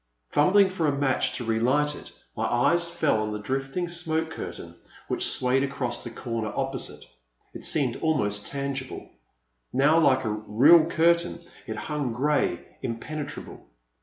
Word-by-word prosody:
Fumbling 190 +6 +4
for 170 -4 0
a 140 -1 0
match 135 -2 +1
to 125 - -3
relight 125 +6 +2
it, - - -10 0.2
my - - -1
eyes 170 +8 +2
fell 155 -10 +1
on 105 0 -2
the 105 - -3
drifting 135 +10 -3
smoke 165 -2 -1
curtain, - - -7 0.3
which - - +2
swayed 130 +1 +2
across 135 -3 -3
the 120 - -6
comer 115 -2 -4
opposite. 135 -1 -4 0.5
It - - -9
seemed 135 -6 +1
almost 105 -11 0
tangible. 140 -1 -5 0.7
How 150 +4 +5
like 130 -5 +3
a - - 0
real 120 +10 +5
curtain 170 +1 +2 0.3
it - - -4
hung, 145 -6 -3
grey, 145 +5 0 0.2
impenetrable. 145 +5 -6
140 Hz, 145 wpm, -26 LUFS, 120-160 Hz, 0.7 s, How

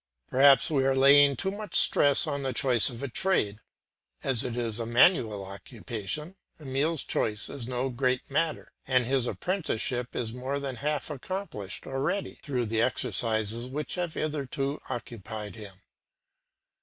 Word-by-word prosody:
Perhaps 135 +4 +6
we 135 -3 +2
are 135 0 +2
laying 140 +1 +6
too 190 +6 -1
much 205 -2 -6
stress 145 +2 +5
on 140 -2 -3
the 135 -1 -2
choice 125 -1 +3
of 120 +1 -8
a - - -1
trade; 115 - 0 0.6
as 130 -3 +2
it 125 -2 -4
is 115 -2 -2
a 115 - -2
manual 115 - +3
occupation, 115 - -5 0.2
Emile's 145 +2 -1
choice 105 -2 -1
is 125 -5 -6
no 125 +1 -2
great 125 +1 -1
matter, 155 +3 -1 0.2
and 130 -2 +3
his 130 0 0
apprenticeship 125 - -1
is 115 -2 -3
more 130 +3 -3
than 135 -3 -5
half 150 +3 -2
accomplished 150 - -6
already, 135 +9 -2
through 125 -4 -2
the 110 0 0
exercises 115 -1 0
which 145 +4 -4
have 175 -3 -3
hitherto 140 -2 -3
occupied 110 -3 -6
him. 100 -4 -11
130 Hz, 150 wpm, -28 LUFS, 115-145 Hz, 0.6 s, Perhaps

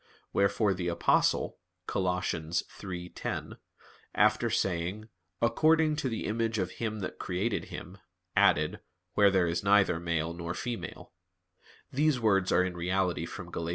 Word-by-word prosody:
Wherefore 100 +1 +3
the 90 -1 -3
Apostle 85 -1 +2 0.3
(Col. - - -1
3:10), 90 +1 -3 0.6
after - - +3
saying, 95 +4 -1 0.3
"According 155 +5 +4
to 135 - -1
the 115 - -3
image 115 +1 0
of 95 -2 -1
Him 110 -2 -4
that 90 - -5
created 95 +5 -1
him," - - -9 0.4
added, 75 +1 +3 0.3
"Where 100 -1 +6
there 95 -2 +3
is 85 +2 -1
neither 100 -4 +4
male 85 -1 -1
nor 85 0 -5
female" 120 -6 -5 0.8
[*these 145 0 +2
words 95 -5 +2
are 90 - +4
in 90 -1 -3
reality 90 +1 0
from - - -8
Gal. 85 0 -3
95 Hz, 135 wpm, -30 LUFS, 85-110 Hz, 0.8 s, Where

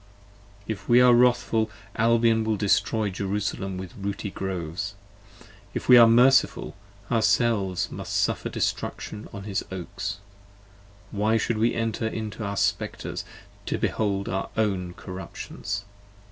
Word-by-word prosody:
If 110 +1 -5
we 120 +1 +7
are 125 0 +7
wrathful 120 -2 +3 0.3
Albion 115 0 +3
will 110 -1 0
destroy 105 +1 +1
Jerusalem 95 0 -2
with 95 -1 -7
rooty 100 0 -4
Groves, 95 +1 -4 0.8
If - - -3
we 125 - +9
are 120 -1 +9
merciful, 125 +4 +4 0.4
ourselves 110 -5 +2
must - - -6
suffer - - 0
destruction 105 0 -3
on 100 - -7
his 100 -1 -2
Oaks: 95 +2 -5 0.9
Why 110 +2 +2
should 110 0 -1
we 115 +2 +2
enter 115 0 -1
into 110 0 -5
our 100 0 -3
Spectres, 100 +2 -1 0.4
to - - 0
behold 100 -2 -1
our 95 - -2
own 95 -5 0
corruptions? 100 +2 -6
105 Hz, 125 wpm, -26 LUFS, 100-115 Hz, 0.9 s, we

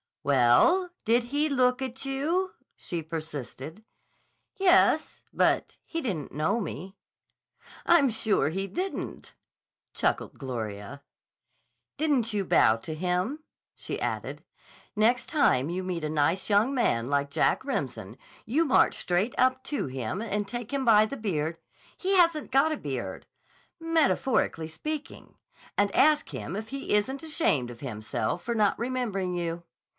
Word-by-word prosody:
"Well, 140 - +4 0.2
did 235 +2 +3
he 290 +5 0
look 255 -2 +2
at 265 0 -4
you?" 320 +8 -1 0.2
she 170 -2 -5
persisted. 155 - -7 0.7
"Yes. 380 -2 +3
But - - +1
he 330 - -4
didn't 185 - -3
know 155 - 0
me." 190 0 -6 0.9
"I'm 330 -6 +6
sure 220 -7 +1
he 195 +4 -2
didn't," 370 - -5 0.6
chuckled - - -1
Gloria. 120 0 -6 0.9
"Didn't 270 -8 +1
you 200 -2 0
bow 110 -9 +4
to 155 +8 -7
him?" 180 - -1 0.3
she - - -4
added. - - -4 0.5
"Next 230 +4 +2
time 165 - +2
you 185 +2 -3
meet 180 -3 -3
a 155 - -1
nice 155 +6 +1
young 210 +6 +3
man 120 - +1
like 140 0 0
Jack - - +2
Remsen, 130 - -4 0.3
you 280 +9 +2
march 270 - +3
straight 180 +7 0
up 260 0 +3
to 290 - -2
him 130 - -4
and 210 -2 -2
take 240 +2 -6
him 275 -2 -1
by 215 -2 +6
the 275 +6 -6
beard—" 165 -6 -2 0.4
"He 385 +1 0
hasn't 335 -6 +3
got 275 +5 +4
a 310 - -1
beard." - - -5 0.5
"—metaphorically 295 - +1
speaking, 300 - -6 0.4
and 205 -1 +2
ask 305 0 +4
him 175 - -5
if 220 +2 -5
he 275 -4 -3
isn't 265 +8 +1
ashamed 300 - +1
of 120 -1 -10
himself 110 +4 -3
for 235 - -2
not 210 -2 +2
remembering 230 -7 -2
you. 170 -1 -3
210 Hz, 140 wpm, -27 LUFS, -, 0.9 s, I'm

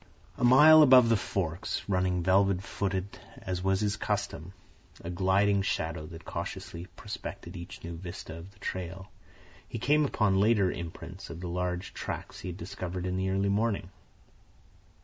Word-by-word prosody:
A - - -5
mile 150 +6 +9
above 130 -5 +8
the 115 - +5
forks, 95 -2 -2
running 90 -2 +1
velvet 95 +1 +3
footed 95 0 -3 0.2
as 90 -1 -4
was 95 +1 +2
his 105 -1 0
custom, 85 -1 -3 0.5
a 85 - -5
gliding 100 +2 +3
shadow 80 -4 -2
that 80 0 -11
cautiously 85 +2 -6
prospected 100 -4 -7
each 90 +3 -9
new 85 0 -6
vista 85 -1 -7
of 85 +3 -10
the 100 - -23
trail, 95 -1 -5 0.6
he - - -5
came 145 +6 +3
upon 105 -8 +2
later 100 -3 +4
imprints 85 +2 -7
of 85 - -7
the 90 - -5
large 90 +1 -3
tracks - - -6
he - - -7
had 90 - -6
discovered 90 0 -5
in 90 0 -1
the 95 0 0
early 95 +1 +1
morning. 100 -3 0
95 Hz, 160 wpm, -29 LUFS, 90-100 Hz, 0.6 s, mile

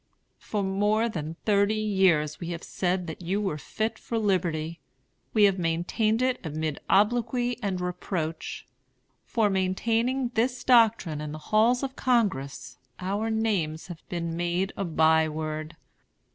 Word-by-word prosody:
For 210 -2 -2
more 205 +4 +2
than 160 -7 -4
thirty 205 0 +3
years 190 -8 +2
we 170 - -5
have 170 -1 -5
said 180 0 -1
that 160 0 -7
you 185 +4 -1
were 190 -8 -2
fit 220 +9 -3
for 230 - -3
liberty. 170 -6 0 0.5
We 215 - +4
have 195 -2 +4
maintained 180 +8 +1
it 255 -1 0
amid 155 -2 -3
obloquy 240 +4 +2
and 195 -4 -1
reproach. 175 -2 -4 0.6
For 225 -3 +2
maintaining 230 +7 0
this 245 +2 0
doctrine 225 - +4
in 150 0 -5
the - - -5
halls 220 - +2
of 265 -1 -3
Congress 140 - 0 0.2
our 200 +4 -1
names 200 -9 0
have 170 -3 -8
been 170 -2 -3
made 175 +3 -1
a 195 - -2
by 160 -1 +3
word. 155 +1 -4
190 Hz, 145 wpm, -27 LUFS, 160-220 Hz, 0.6 s, We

